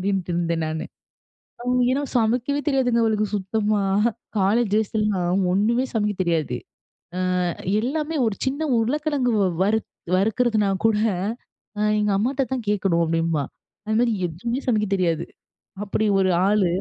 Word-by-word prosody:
அப்டின்ட்டு 190 -1 -1
இருந்தேன் 170 -1 0
நானு. 155 0 -3 0.8
அ - - -8 0.3
ஏன்னா 265 +3 +1
சமைக்கவே 245 +5 +1
தெரியாதுங்க 250 -4 +2
அவளுக்கு 215 -1 +1
சுத்தமா. 205 +1 0 0.6
காலேஜ் 205 +3 +2
டேஸ்லலாம், 200 -4 +1
ஒண்ணுமே 225 +7 +2
சமைக்க 210 -2 0
தெரியாது. 165 -4 0 0.6
அ - - -1 0.6
எல்லாமே 305 +5 -2
ஒரு 215 - -1
சின்ன 275 +3 -2 0.2
உருளைக்கிழங்கு 275 +2 0 0.3
வறுத் 215 +2 0 0.3
வறுக்குறதுனா 215 +1 +2 0.2
கூட 220 - +2 1.0
எங்க 210 0 +1
அம்மாட்ட 255 +7 0
தான் 250 -4 -3
கேக்கணும் 190 -5 +1
அப்டின்பா. 165 -2 0 0.4
அது 215 0 -1
மாதிரி 240 -1 +3 0.2
எதுவுமே 235 +10 -3
சமைக்க 215 -4 +2
தெரியாது 170 -3 0 0.6
அப்டி 215 +1 -1
ஒரு 190 -1 +2 0.2
ஆளு. 205 -1 +3
210 Hz, 125 wpm, -23 LUFS, 190-240 Hz, 1.0 s, மாதிரி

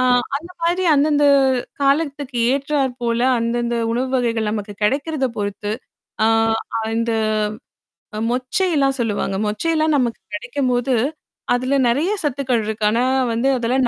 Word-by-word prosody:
ஆ - - +3 0.3
அந்த 335 +5 -9
மாதிரி 350 +2 +1
அந்தந்த 290 0 +3 0.6
காலத்துக்கு 280 -2 0 0.2
ஏற்றார் 275 -1 0
போல 235 0 0 0.2
அந்தந்த 235 +1 -1 0.2
உணவு 255 +2 -1
வகைகள் 230 -3 0
நமக்கு 210 -1 -4
கெடைக்கிறத 280 +5 0
பொறுத்து. 205 0 -3 0.5
ஆ - - +4 0.7
அந்த 230 0 0 1.2
மொச்சைலாம் 275 +2 +1
சொல்லுவாங்க. 205 -4 -1
மொச்சையெல்லாம் 310 +8 +1
நமக்கு 240 -3 0 0.2
கெடைக்கும்போது 250 +1 0 0.6
அதுல 255 +3 0
நெறைய 290 +11 +1
சத்துக்கள் 260 -5 0
இருக்கு. 215 0 -4
ஆனா 235 +3 +1 0.3
வந்து 235 +4 0
அதெல்லாம் 250 +2 +1
255 Hz, 115 wpm, -20 LUFS, 230-285 Hz, 1.2 s, ஆ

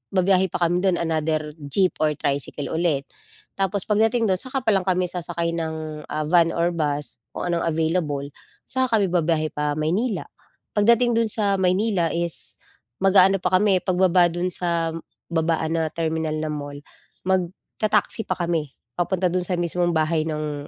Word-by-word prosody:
babiyahe 190 0 +3
pa 175 - -2
kami 175 +1 +2
do'n 185 -2 +2
another 155 -2 -1 0.2
jeep 185 +5 +1
or 150 -1 +2
tricycle 140 +1 -3
ulit. 160 -4 +1 0.5
Tapos 195 0 -1
pagdating 225 +2 +2
do'n 190 -2 +1
saka 260 -1 -4
pa 220 - +4
lang 195 - +3
kami 185 -1 +1
sasakay 170 -1 -3
ng, 160 -2 -4
ah, 155 0 -2
van 170 +1 +4
or 170 +1 0
bus, 145 -6 -3
kung 175 - -3
anong 170 - 0
available. 160 -3 0 0.4
Saka 260 -3 +1
kami 200 - +2
babiyahe 160 -3 +1
pa 150 0 -1
Maynila. 185 +7 0 0.5
Pagdating 235 +3 +4
do'n 230 -1 +2
sa 205 -2 +1
Maynila 185 -1 +2
is, 170 -1 -4 0.5
mag-aano 195 0 +6
pa 180 0 -2
kami 195 -3 +3
pagbaba 180 -1 +4
do'n 175 +1 -1
sa 165 -2 -1 0.4
babaan 160 0 0
na 160 - 0
terminal 160 -1 -2
na 155 0 -2
mall 145 -1 -5 0.5
magta-taxi 190 +4 -1
pa - - 0
kami 165 -5 -2 0.2
papunta 180 0 +1
do'n 180 0 0
sa 180 - 0
mismong 175 0 0
bahay 155 0 +1
ng, 150 -2 -4
175 Hz, 160 wpm, -23 LUFS, 155-190 Hz, 0.5 s, mag-aano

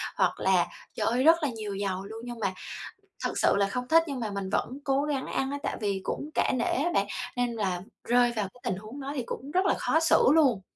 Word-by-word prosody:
hoặc - - +1
là, - - +3 0.3
trời - - -1
ơi, 245 +3 +2
rất 325 +2 +6
là 295 - +2
nhiều 215 -4 -5
dầu 195 -1 -2
luôn, 220 +2 -8
nhưng 240 -1 -7
mà 195 -3 0 0.7
thực - - -2
sự - - +4
là 200 0 +3
không 250 +5 -3
thích 330 +2 +6
nhưng 275 -3 -3
mà 225 -3 -2
mình 200 -1 -3
vẫn 255 +6 -1
cố 270 0 +2
gắng 290 -3 -1
ăn 270 0 -1
á, 285 - -2
tại - - -2
vì 200 -2 0
cũng 295 - -3
cả - - +2
nể 240 - 0
á 320 +6 +1
bạn, 200 - +3 0.3
nên 245 -1 +1
là 190 -5 -1 0.2
rơi 245 0 +4
vào 210 -3 -1
cái 250 - -20
tình 185 - -1
huống 215 +7 -9
đó 275 +1 -4
thì 260 - -1
cũng 275 +4 -6
rất 370 +3 +2
là - - +4
khó 320 - +2
xử 325 - +4
luôn. 270 -11 +4
245 Hz, 255 wpm, -28 LUFS, 205-280 Hz, 0.7 s, rất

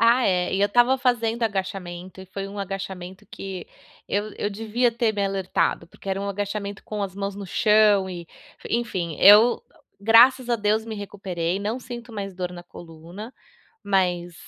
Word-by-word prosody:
Ah, 235 +2 +5
é, 180 -1 +1
e 195 - 0
eu 200 - +5
estava 240 +5 +4
fazendo 240 -3 0
agachamento 190 -3 -4
e 190 - -11
foi 195 +1 -6
um 200 +1 -9
agachamento 190 0 -6
que 190 -3 -7 0.4
eu 205 +1 -1
eu - - 0
devia 225 +4 0
ter 230 -1 +1
me 205 -1 -1
alertado, 190 -3 -1
porque 195 - -12
era 195 0 -1
um 200 - -3
agachamento 200 0 -4
com 210 -1 -4
as 190 -2 -4
mãos 200 0 -3
no 200 0 -7
chão 210 0 +4
e, 175 -2 -6 0.5
enfim, 185 -9 -2
eu 210 +5 +7 0.4
graças 240 +4 +6
a 240 - +3
Deus 215 +1 +1
me 225 -1 -6
recuperei, 190 -4 -3
não 215 +5 -3
sinto 240 -1 -9
mais 200 -2 -5
dor 180 -1 -4
na 175 -1 -9
coluna, 175 +6 -11 0.5
mas 180 -3 0
200 Hz, 175 wpm, -24 LUFS, 185-220 Hz, 0.5 s, eu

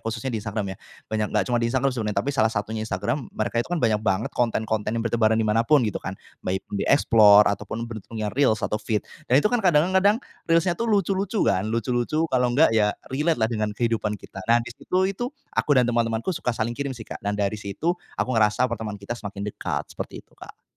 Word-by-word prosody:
khususnya 115 +3 -4
di 110 - -2
Instagram 100 -2 -3
ya, - - -10 0.3
banyak 110 -1 -2
gak 105 -3 +1
cuma 120 +3 0
di 115 - +1
Instagram 130 +2 +1
sebenarnya. 110 -4 -3
Tapi 140 - 0
salah 110 -5 +3
satunya 110 0 -3
Instagram, 115 +7 -2
mereka 115 +2 0
itu - - -5
kan 175 - -1
banyak 110 -2 +2
banget 100 0 0
konten-konten 110 -2 -1
yang 115 - -2
bertebaran 110 -1 +2
di 110 - +1
mana 110 +2 +2
pun 130 +1 +4
gitu 105 - -2
kan, - - -5 0.2
baik 95 +1 -3
di 100 - -1
Explore 105 -6 +7
ataupun 115 +3 -5
bentuknya 110 -1 -5
Reels 125 -6 +2
atau 105 - -1
Feed 105 -1 -1 0.2
dan 125 - +3
itu - - +6
kan 240 - +2
kadang-kadang 190 +4 +4 0.3
Reels-nya 165 +2 +3
tuh 230 +6 -3
lucu-lucu 200 0 +1
kan, 95 +4 +1
lucu-lucu 120 +7 0
kalau 125 -1 +3
enggak 130 +1 +4
ya 105 -2 +2 0.2
relate 155 +4 +1
lah 110 -1 +2
dengan 105 -1 -2
kehidupan 115 -3 0
kita. 95 0 -11
Nah 120 +1 +6
di 120 - -8
situ 185 +8 0
itu, 195 +6 -2 0.2
aku - - -1
dan 125 - +5
teman-temanku 115 +5 0
suka 170 -6 -4
saling 115 +2 -1
kirim 140 -1 -4
sih 115 - -8
Kak, - - -8
dan 105 +1 -2
dari 105 +1 -1
situ 130 - -1 0.2
aku - - -1
ngerasa 110 +1 +3
pertemanan 110 -3 -4
kita 100 +4 -6
semakin 100 -3 -6
dekat, 105 - -3
seperti - - -7
itu - - -33
Kak. - - -14
115 Hz, 220 wpm, -24 LUFS, 105-135 Hz, 0.3 s, Explore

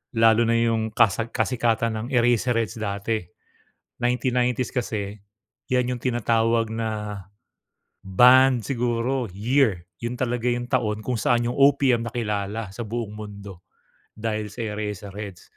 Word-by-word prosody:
Lalo 115 0 +5
na 115 - +2
'yong 115 -1 0
kasa 110 0 +3
kasikatan 115 -3 0
ng 115 - -5
Eraserheads 120 -3 +2
dati. 110 +1 -2 0.8
Nineteen 125 0 +1
nineties 125 0 0
kasi 105 -5 -3 0.6
'yan 125 -1 +1
'yong 120 - -9
tinatawag 115 -2 +1
na 105 -3 -4 0.8
band 125 +5 +6
siguro, 120 -1 -1
year. 105 -3 +1 0.2
'Yon 120 +1 -3
talaga 120 -1 -1
'yong 120 0 -2
taon 105 -3 0
kung 125 +2 -2
saan 120 +2 +2
'yong 120 - -3
OPM 135 -4 +4
nakilala 105 -2 -3
sa 120 - -5
buong 110 -1 -4
mundo 100 -3 -9 0.5
dahil 110 -1 -3
sa 120 - -6
sa 105 - -4
Eraserheads. 100 -2 -6
115 Hz, 130 wpm, -24 LUFS, 105-120 Hz, 0.8 s, band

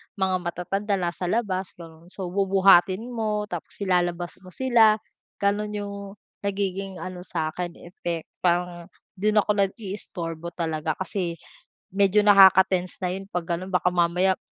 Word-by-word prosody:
mga 190 -2 +1
matatanda 195 +4 -2
nasa 180 -1 -2
labas, 190 -3 -1
gano'n. 165 -1 -13
So, 185 -1 -6
bubuhatin 195 0 +4
mo, 215 -3 -1
tapos 175 -2 -6
ilalabas 175 -2 0
mo 185 - -17
sila. 225 +1 +4 0.5
Ganun 210 +1 0
yung 205 -1 -4 0.4
nagiging 195 -1 -3
ano 185 -1 -6
sa 165 -3 -3
akin, 175 0 -5
effect, 170 -2 -5
parang 175 -1 0 0.3
do'n 210 +1 +3
ako 210 0 0
nag-i-istorbo 185 -4 -4
talaga. 160 -2 -2
Kasi 190 -3 -3 0.5
medyo 200 +2 +3
nakaka-tense 190 -3 +5
na 180 - 0
'yon 190 +2 -5
'pag 175 -1 -3
gano'n. 185 +2 -8
Baka 180 0 +3
mamaya 180 +2 +2
185 Hz, 135 wpm, -25 LUFS, 175-200 Hz, 0.5 s, nakaka-tense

